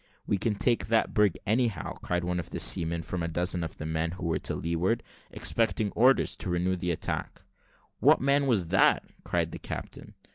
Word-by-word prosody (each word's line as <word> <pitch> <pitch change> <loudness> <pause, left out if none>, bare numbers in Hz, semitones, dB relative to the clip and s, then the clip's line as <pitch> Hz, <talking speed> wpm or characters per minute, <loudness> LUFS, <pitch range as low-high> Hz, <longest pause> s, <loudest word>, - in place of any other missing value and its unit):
"We 100 - 0
can 105 +2 0
take 120 +3 +2
that 115 0 +1
brig, 105 -4 +3
anyhow," 110 -4 0
cried 90 0 -1
one 90 0 -1
of 85 - -6
the - - -5
seamen, 85 0 +2
from 90 +1 -4
a 85 - -1
dozen 90 +1 0
of 80 - -6
the 75 - -6
men 80 +1 -1
who 90 - -7
were 80 - 0
to - - -4
leeward, 85 +8 -1 0.3
expecting 110 -2 0
orders 130 +4 +3
to 95 - -5
renew 90 +2 0
the 90 0 -3
attack. 85 - -3 0.6
"What - - +5
man 140 +1 +2
was 100 -10 +1
that?" 95 - +4 0.2
cried 85 -2 -1
the - - -7
captain. - - -7
90 Hz, 195 wpm, -28 LUFS, 85-110 Hz, 0.6 s, What